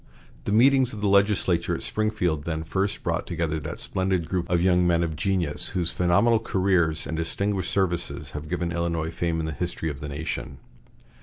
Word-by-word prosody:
The - - -1
meetings 130 +3 +4
of 105 - -6
the 105 - +1
legislature 95 -4 +2
at - - -6
Springfield 90 -9 -1
then 80 -1 -2
first 95 +5 -2
brought - - -1
together 80 -2 -1
that 75 - -6
splendid 95 -3 -1
group 90 -2 -2
of 90 -1 +3
young 90 0 +3
men 85 0 +3
of 80 -2 -2
genius 85 -3 0
whose 85 -1 0
phenomenal 100 +6 +3
careers 90 -7 +1
and 75 +4 -3
distinguished 95 +4 -1
services 90 -3 -1
have 75 +1 -7
given 85 -1 -1
Illinois 85 -1 -1
fame 85 -1 -1
in 80 - -2
the 80 - -3
history 80 -1 -2
of 70 - -8
the 75 - -6
nation. 75 -2 -4
85 Hz, 185 wpm, -25 LUFS, 80-95 Hz, -, meetings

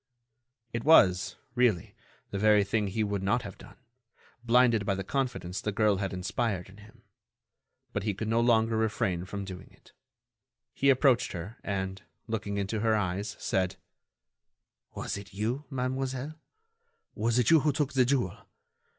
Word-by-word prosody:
It 115 0 -2
was, 95 - +5 0.2
really, 120 -8 +1 0.4
the 100 - -2
very 105 0 +5
thing 105 +1 0
he 110 +3 -1
would 100 -2 -2
not 115 +6 +1
have 100 -3 -9
done, 100 - -14 0.7
blinded 120 -2 +4
by 100 -1 0
the 95 - -4
confidence 120 -6 -2
the 105 - -2
girl 105 -1 +2
had 95 0 -2
inspired 95 +1 -2
in 95 - -15
him. 105 +1 -17 0.9
But 100 - -1
he 105 0 -2
could 110 +2 -4
no 115 +1 +2
longer 115 -1 +3
refrain 95 -5 0
from 100 +1 -5
doing 95 -2 -9
it. - - -23 0.8
He 140 - +2
approached 130 -2 +3
her 95 +7 -7
and, 95 -1 -3 0.2
looking 105 -3 -3
into 100 +2 -2
her 110 0 +2
eyes, 100 0 -2
said: 95 -1 0 1.2
"Was - - -3
it 100 0 -11
you, 120 +8 -2
mademoiselle? 130 +1 -3 0.8
Was 115 +2 0
it 125 +2 +3
you 165 - +8
who 150 +1 +2
took 145 0 -1
the 130 -1 +4
jewel? 120 -5 -1
110 Hz, 160 wpm, -29 LUFS, 100-125 Hz, 1.2 s, you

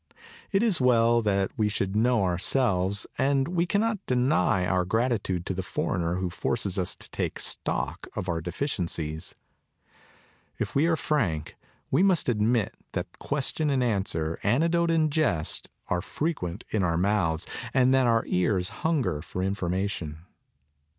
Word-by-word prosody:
It 195 +1 +3
is 205 - +1
well 120 -2 +4
that 100 -3 +1
we 105 -1 +2
should 100 -1 -2
know 115 0 +3
ourselves; 95 +1 +1
and 135 0 +2
we 175 0 +1
cannot 210 +1 0
deny 125 -7 +2
our 90 0 +2
gratitude 100 -3 0
to - - -2
the 95 - -2
foreigner 90 -2 -1
who 90 -1 -2
forces 100 -1 -1
us 90 - -1
to - - -13
take - - -3
stock - - -2
of - - -3
our 85 -2 -1
deficiencies. 85 - -3 1.2
If - - -3
we 145 +4 +3
are 165 - +3
frank 95 - -1 0.4
we - - +4
must 185 -8 +3
admit 110 -1 +1 0.2
that - - -5
question 150 +2 0
and 135 -3 +2
answer, 95 -8 -1
anecdote 165 - +2
and 160 -2 +2
jest, 95 - 0 0.2
are 90 - 0
frequent 105 - -3
in 110 - +1
our 85 -2 +1
mouths 90 -4 +1 0.3
and 130 0 +4
that 130 -2 +4
our 115 -1 +3
ears 90 0 +1
hunger 130 - 0
for 90 +3 -4
informa 95 0 -1
tion. 80 -7 -5
105 Hz, 150 wpm, -27 LUFS, 90-135 Hz, 1.2 s, well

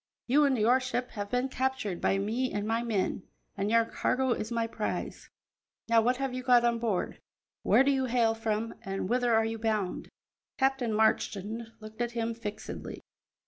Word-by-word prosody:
You 290 +4 +4
and 270 -2 +2
your 235 +4 +4
ship 250 -1 -3
have 205 -2 -5
been 250 +3 0
captured 260 -8 -2
by 195 - +2
me 225 +6 -1
and 205 0 -2
my 225 +1 +1
men, 215 -5 -1 0.3
and 200 +1 -1
your 230 0 +4
cargo 260 +2 0
is 220 -1 -2
my 230 -1 0
prize. 225 - -4 0.6
Now, 230 -1 +5
what 245 +3 +2
have 270 -1 -2
you 255 - -3
got 245 -2 +5
on 235 -1 +2
board, 220 -6 -2 0.4
where - - +5
do 280 - +3
you 265 -1 +1
hail 235 -2 +2
from, 225 0 -2
and 195 -1 -3
whither 245 +2 +1
are 225 0 +3
you 225 0 -3
bound?" 215 -4 -1 0.5
Captain 265 -3 +1
Marchand 220 0 0
looked 215 +1 -9
at 240 0 -1
him 230 0 -1
fixedly. 215 -2 -6
230 Hz, 185 wpm, -29 LUFS, 215-250 Hz, 0.6 s, Now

